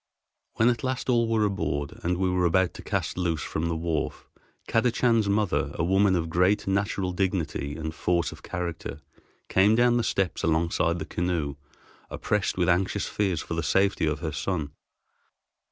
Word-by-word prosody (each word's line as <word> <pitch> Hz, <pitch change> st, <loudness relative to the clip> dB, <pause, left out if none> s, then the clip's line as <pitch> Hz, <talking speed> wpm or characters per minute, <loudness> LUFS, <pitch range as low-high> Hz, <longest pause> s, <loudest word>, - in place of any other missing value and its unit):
When 115 Hz, +2 st, +4 dB
at 120 Hz, -2 st, -1 dB
last 130 Hz, 0 st, -1 dB
all 115 Hz, -1 st, +3 dB
were 110 Hz, -2 st, +2 dB
aboard 70 Hz, -8 st, -2 dB
and 90 Hz, +1 st, 0 dB
we 95 Hz, 0 st, +1 dB
were 90 Hz, -1 st, +1 dB
about 95 Hz, +1 st, +2 dB
to -, -, -9 dB
cast -, -, -2 dB
loose 85 Hz, -4 st, 0 dB
from 80 Hz, +2 st, -2 dB
the 85 Hz, -, -1 dB
wharf, 80 Hz, -1 st, -3 dB, 0.4 s
Kadachan's 115 Hz, -2 st, +2 dB
mother, 105 Hz, -1 st, 0 dB
a -, -, -1 dB
woman 95 Hz, +2 st, +3 dB
of 85 Hz, -2 st, -1 dB
great 90 Hz, +5 st, +2 dB
natural 95 Hz, -1 st, 0 dB
dignity 90 Hz, -6 st, -2 dB
and 80 Hz, 0 st, -4 dB
force 85 Hz, -1 st, 0 dB
of -, -, -12 dB
character, 85 Hz, -5 st, -5 dB, 0.5 s
came 100 Hz, +3 st, +4 dB
down 120 Hz, 0 st, +4 dB
the 120 Hz, -, +1 dB
steps 95 Hz, -4 st, -1 dB
alongside 85 Hz, +1 st, +1 dB
the 80 Hz, -, -4 dB
canoe 85 Hz, -5 st, -2 dB, 0.5 s
oppressed 105 Hz, -3 st, -1 dB
with 90 Hz, -2 st, +2 dB
anxious 95 Hz, +4 st, +1 dB
fears 95 Hz, -6 st, -1 dB
for -, -, -5 dB
the 85 Hz, -, -1 dB
safety 95 Hz, 0 st, +2 dB
of 75 Hz, -1 st, -1 dB
her 80 Hz, -, -2 dB
son. 75 Hz, -1 st, -2 dB
90 Hz, 170 wpm, -26 LUFS, 80-100 Hz, 0.5 s, When